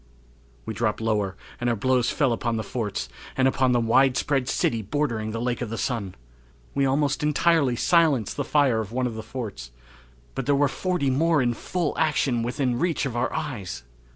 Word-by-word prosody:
We - - -4
dropped 110 -2 -1
lower 105 -4 -1 0.2
and 120 - 0
our 120 - +1
blows 125 +2 +2
fell 135 -6 +2
upon 115 0 -1
the 110 - -2
forts, 105 - -3 0.3
and 130 0 +4
upon 130 -1 +2
the 120 - +3
widespread 130 +3 +2
city 115 -2 +1
bordering 115 -1 -1
the 115 +1 -4
Lake 120 +1 -2
of 120 - -3
the 115 - -4
Sun. 110 -8 -2 0.6
We 140 -1 +2
almost 140 +1 +1
entirely 150 -3 +3
silenced 150 - +2
the - - -1
fire 140 -6 +2
of 110 -1 -4
one 125 +1 -1
of 120 - -2
the 110 - -5
forts; 110 - -6 0.6
but 135 - -4
there 145 - +4
were 145 +1 +3
forty 175 -4 -1
more 160 +4 +3
in 120 -2 +2
full 170 +5 -2
action 150 -6 +1
within 125 +1 -1
reach 170 -3 0
of 125 -4 -3
our 120 - 0
eyes! 125 - -4
125 Hz, 190 wpm, -25 LUFS, 115-145 Hz, 0.6 s, and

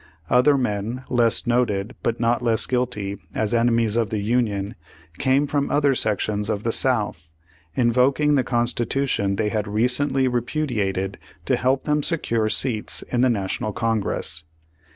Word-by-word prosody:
Other 130 +3 +5
men 115 +1 -2
less 120 -2 +2
noted 120 -3 0
but 115 0 -1
not 120 +1 +1
less 115 -3 +1
guilty 115 -6 -2 0.2
as 110 +1 -1
enemies 115 -2 +2
of 115 -2 +1
the 110 - -2
Union 105 -2 -1 0.5
came 135 +2 +2
from 145 -1 -1
other 145 -1 +2
sections 105 -2 -1
of 105 -1 -2
the 115 - 0
South, 105 -11 0 0.5
in 120 -2 +2
voking 140 +4 +3
the 130 - +2
Constitution 120 -3 0
they 105 +1 0
had 105 -1 -2
recently 130 +5 +1
repudi 125 +2 -2
ated, 95 -1 -2 0.3
to - - +2
help 130 +2 0
them 150 0 +1
secure 115 -9 0
seats 110 -1 0
in 120 - +1
the 130 - +4
National 105 -1 -2
Congress. 105 -8 0
120 Hz, 150 wpm, -22 LUFS, 105-130 Hz, 0.5 s, Other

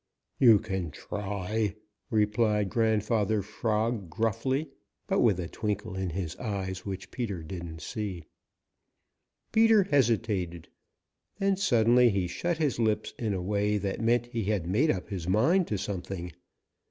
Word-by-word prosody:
"You 115 -5 +8
can 95 -5 -3
try," 105 +5 -3 0.3
replied 105 -2 +2
Grandfather 110 -2 +1
Frog 110 -1 -1
gruffly, 115 - -1 0.3
but - - +1
with 105 -7 +3
a 85 - -3
twinkle 105 +1 -3
in 95 -1 -2
his 85 -2 -4
eyes 95 -5 -4
which 95 -1 -6
Peter 100 -9 -3
didn't 80 -1 -7
see. 100 -6 -4 1.3
Peter 220 -2 +5
hesitated. 110 - 0 0.7
Then 195 -1 +2
suddenly 120 - +4
he 100 -4 0
shut 165 - -2
his 150 -7 0
lips 110 -2 0
in 110 -4 -1
a 90 - -3
way 105 +2 +1
that 100 +1 -3
meant 120 +1 +3
that 120 - -19
he 115 -4 -2
had 100 -5 0
made 110 - +2
up 95 -3 -1
his 90 -5 -4
mind 160 - +3
to 105 - -1
something. 95 -2 -4
105 Hz, 140 wpm, -29 LUFS, 95-115 Hz, 1.3 s, You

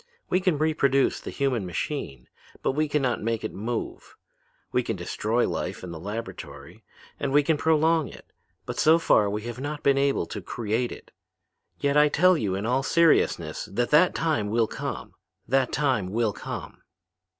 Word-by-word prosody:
We 185 - +3
can 185 -5 +1
reproduce 140 -3 +2
the - - -7
human 130 -6 -1
machine, 85 - -4 0.4
but - - +2
we 155 +3 0
can 150 -1 0
not 125 -2 0
make 115 0 -2
it 110 - -4
move. 120 - -5 0.6
We 125 - +2
can 115 -2 -3
destroy 105 +6 -1
life - - -4
in 90 - -6
the 80 - -7
laboratory, 105 +6 -7 0.4
and 140 -1 -1
we 145 +1 +4
can 160 +2 +2
prolong 160 0 +2
it, - - -12 0.4
but - - -5
so 160 +2 +6
far 105 -10 +3
we 105 +1 -3
have 120 +1 -6
not 145 +2 -5
been 140 -1 +4
able 140 0 +1
to - - -6
create 115 +1 -2
it. - - -11 0.7
Yet 140 +1 +1
I 150 0 +6
tell 185 +5 +4
you 100 - -1
in 100 +2 -3
all 125 +3 +1
seriousness 165 +3 +2
that 120 +5 -1
that 165 +4 +5
time 150 -11 0
will 115 +1 +2
come; - - -6 0.3
that 130 +1 +2
time 130 -10 +1
will 110 +2 0
come.' - - -7
135 Hz, 180 wpm, -26 LUFS, 110-150 Hz, 0.7 s, so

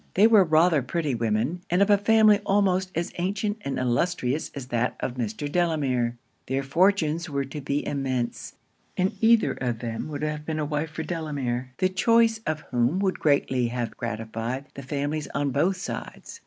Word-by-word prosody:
They 200 - +6
were 220 -3 +7
rather 160 -2 +4
pretty 150 +2 -2
women; 115 +8 -1
and 175 - +2
of 205 - +2
a - - +8
family 215 0 +5
almost 190 -2 +2
as 170 +1 -2
ancient 205 +4 -1
and 140 - -3
illustrious 130 +3 0
as 130 -3 -7
that 120 0 0
of 120 - -3
Mr. 120 +2 -4
Delamere. 140 -8 0 0.3
Their 135 +1 -1
fortunes 170 +1 +2
were 140 -1 -1
to 140 +3 -7
be 140 +2 -2
immense; 130 -4 -3 0.4
and 190 +3 +1
either 230 -1 +4
of 125 -3 -2
them 115 +2 -4
would 150 -1 -5
have 150 0 -2
been 155 0 -3
a 155 - -1
wife 150 +1 -2
for 160 +1 -5
Delamere, 135 -7 -3
the 185 - +2
choice 225 +4 +3
of 155 0 -1
whom 125 +6 +2
would 190 -1 0
greatly 130 -4 +2
have 120 -1 -3
gratified 115 +3 -4
the 140 - -8
families 145 +2 -3
on 145 -1 0
both 170 +8 +1
sides. 195 - -7
150 Hz, 180 wpm, -25 LUFS, 125-180 Hz, 0.4 s, a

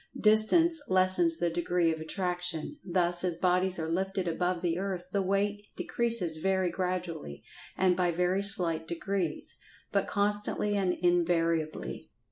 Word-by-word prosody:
Distance 295 +11 +5
lessens 185 - +2
the 170 - -1
degree 175 0 0
of 160 - -7
attraction—thus 175 - -1
as 180 -2 0
bodies 180 +2 +2
are 160 -1 -3
lifted 190 +2 -2
above 175 +1 -2
the 170 0 -1
earth 190 -2 -4
the 200 - 0
weight 200 +2 -2
decreases 230 -9 0
very 190 +1 0
gradually, 175 - -5 0.3
and 185 -1 +2
by 180 -1 0
very 180 +3 0
slight 175 -5 +3
degrees, 175 -1 -4 0.4
but - - 0
constantly 205 0 -1
and 190 -3 0
invariably. 170 -3 -1
180 Hz, 130 wpm, -29 LUFS, 170-195 Hz, 0.4 s, Distance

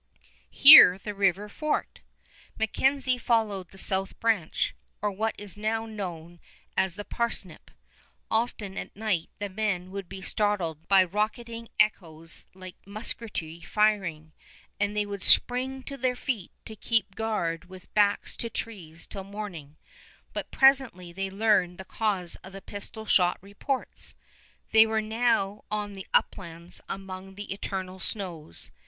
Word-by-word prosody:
Here 275 -10 +10
the 210 +2 -6
river 200 0 +1
forked. 300 +8 -3 0.6
MacKenzie 255 +3 +1
followed 210 -7 0
the 195 - -16
south 195 0 0
branch, 220 -8 +1 0.3
or 210 0 -1
what 220 +3 -1
is 205 -3 -7
now 220 +2 -1
known 175 -6 -7 0.4
as 190 -2 +1
the 205 0 -6
Parsnip. 225 -7 -2 0.6
Often 220 -3 -1
at - - -8
night 205 -6 -1
the 205 - -3
men 190 -2 -2
would 195 -2 -6
be 190 0 -8
startled 180 -8 0
by 195 -1 +6
rocketing 230 +4 -3
echoes 165 -6 0
like 185 -1 -10
musketry 200 -5 -3
firing, 190 -8 0 0.5
and 205 +1 0
they 210 - +2
would 200 -2 -6
spring 260 +2 +4
to 275 +1 -7
their 255 -1 0
feet 240 -8 -3
to 220 - -8
keep 215 -2 0
guard 180 -7 -2
with 185 0 -14
backs 205 -1 +2
to 230 - -3
trees 180 -9 -6
till 195 - -6
morning; 190 -8 -8 0.6
but - - -4
presently 260 -11 +3
they 195 +1 -3
learned 195 -3 +2
the 190 - -9
cause 195 -6 -1
of 190 - -13
the 195 - -8
pistol 205 +2 -5
shot 180 -4 +4
reports. 205 +8 -3 0.6
They 220 0 +7
were 220 0 +1
now 215 -2 0
on 210 -1 -3
the 195 -1 -9
Uplands 170 -2 -1
among 195 0 -7
the 205 -1 -5
eternal 190 -2 -5
snows. 175 - -4
200 Hz, 140 wpm, -27 LUFS, 185-220 Hz, 0.6 s, Here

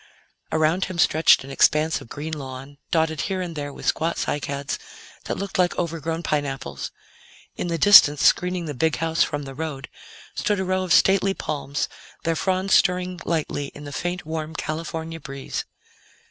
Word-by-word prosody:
Around 160 +4 +2
him 185 -1 -6
stretched 160 -3 +5
an 135 - -9
expanse 155 +3 +3
of - - -13
green 155 +2 -5
lawn, 135 -1 -7
dotted 160 -2 +1
here 190 -1 -2
and 175 -3 -4
there 145 -1 -4
with - - -10
squat 165 +1 +1
cycads 140 -1 -2 0.5
that - - -3
looked 200 -1 -4
like 180 -1 +2
overgrown 165 -1 -2
pineapples; 140 -3 -2 0.7
in - - -3
the 170 -1 -1
distance, 150 -5 +8
screening 180 -1 +3
the 150 - -4
big 160 +4 +1
house 165 0 0
from 145 0 -3
the 135 -1 -8
road, 145 -2 -5 0.4
stood 205 -2 0
a 190 - -1
row 185 0 0
of 185 -2 -4
stately 195 +2 +4
palms, 140 -1 -3 0.4
their 165 0 +1
fronds 190 +3 0
stirring 180 -1 +2
lightly 155 -3 -1
in 145 - -9
the 145 - -7
faint, 175 -1 -3
warm 160 0 -4
California 165 +1 -4
breeze. 140 -3 -5
160 Hz, 170 wpm, -24 LUFS, 145-180 Hz, 0.7 s, distance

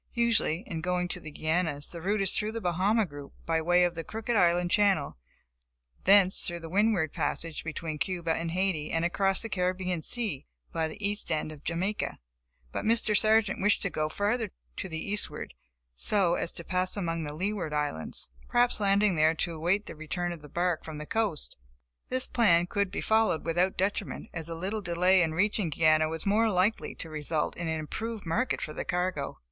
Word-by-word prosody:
Usually, 230 -7 +2
in 165 -7 -5
going 180 +1 0
to - - -1
the 155 - -9
Guianas, 155 -1 0
the 170 - -7
route 200 +4 0
is 190 - +4
through 215 +1 0
the 230 - -3
Bahama 195 +4 +2
group, 145 -4 -10
by 165 -1 +1
way 175 +2 +4
of 175 -1 +1
the 165 -1 -5
Crooked 225 +4 -3
Island 175 -2 +3
Channel, 195 -9 +2 0.9
thence 195 -1 +6
through 175 -1 -2
the 165 -1 -8
Windward 200 -6 +2
Passage, 165 -2 -2
between 160 -1 -4
Cuba 170 -1 -1
and 165 +1 -2
Haiti 175 -3 -1
and 165 +1 0
across 195 +3 +1
the - - -3
Caribbean 180 -3 -1
sea 210 - -1 0.2
by 160 -1 0
the 155 - -9
east 205 +1 -3
end 155 0 -1
of 150 -2 -12
Jamaica. 185 +6 -2 0.5
But - - -3
Mr. 220 -1 +2
Sargent 215 -2 +3
wished 210 +3 +3
to 195 - -1
go 155 0 -1
further 210 +5 0 0.3
to 190 - -4
the 160 - -4
eastward 205 +4 -2 0.4
so 175 - +3
as 170 - -1
to 170 - -7
pass 185 +2 -1
among 165 -4 -2
the 150 -1 -5
Leeward 190 -2 -2
Islands, 145 - -3 0.2
perhaps 240 -2 +3
landing 200 0 +3
there 155 +1 +3
to 170 +1 -1
await 175 +6 0
the - - -8
return 175 +3 -3
of 170 -3 -7
the 150 - -12
bark 175 0 0
from 160 -2 -7
the 150 - -6
coast. 215 -6 -1 0.5
This 255 0 +1
plan 175 -8 +3
could 200 +2 -1
be - - -4
followed 220 -7 +2
without 175 +3 +1
detriment, 195 +2 -2
as 165 -1 -4
a 165 - -4
little 195 +6 -3
delay 180 +1 +3
in 160 -2 0
reaching 205 0 +1
Guiana 155 0 +3
was 160 0 -4
more 215 +3 +3
than 210 - 0
likely 195 +5 +1
to - - -5
result 155 0 -1
in 170 - -4
an 160 -1 -1
improved 220 +7 -5
market 230 +11 0
for 155 - -5
the - - -4
cargo. 180 -5 -2
180 Hz, 200 wpm, -29 LUFS, 160-205 Hz, 0.9 s, thence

